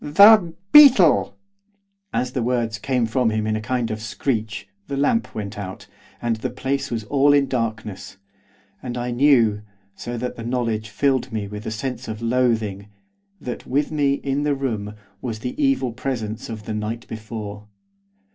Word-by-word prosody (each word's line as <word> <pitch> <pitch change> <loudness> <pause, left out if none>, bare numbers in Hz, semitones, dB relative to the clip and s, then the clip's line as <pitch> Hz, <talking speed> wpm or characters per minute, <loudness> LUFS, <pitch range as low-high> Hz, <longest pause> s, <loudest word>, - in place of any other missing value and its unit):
'THE 200 +3 +7 0.2
BEETLE!' 255 - +7 0.7
As 125 0 -1
the 130 - -2
words 115 -2 -1
came 125 0 0
from 115 +1 +1
him 110 -1 -1
in 110 0 0
a 110 - -2
kind 120 +1 -1
of 110 0 -4
screech, 110 -3 -3 0.2
the 140 - -3
lamp 230 - +1
went 105 -1 -5
out, 95 -2 -7 0.3
and 115 -1 -1
the 110 - -3
place 135 +1 -2
was 115 -2 -3
all 140 +5 +3
in 140 -1 +3
darkness, 110 -6 -4 0.6
and 125 -1 -5
I 120 0 -2
knew, 120 -5 +4 0.3
so 120 +4 -6
that 125 +2 -4
the 115 - -6
knowledge 115 -3 -2
filled 130 +3 0
me 105 -2 -3
with 105 +1 -7
a - - 0
sense 125 +3 -4
of 110 -1 -5
loathing, 115 -4 0 0.5
that 125 - -6
with 145 +4 0
me, 145 -2 +2
in 140 0 -2
the 145 -1 +1
room, 110 -6 -3 0.3
was 115 -4 -4
the 125 +1 -3
evil 135 -2 +2
presence 115 -4 -4
of 110 -2 -6
the 110 - -4
night 110 +2 -4
before. 105 -2 -7
120 Hz, 170 wpm, -22 LUFS, 110-135 Hz, 0.7 s, THE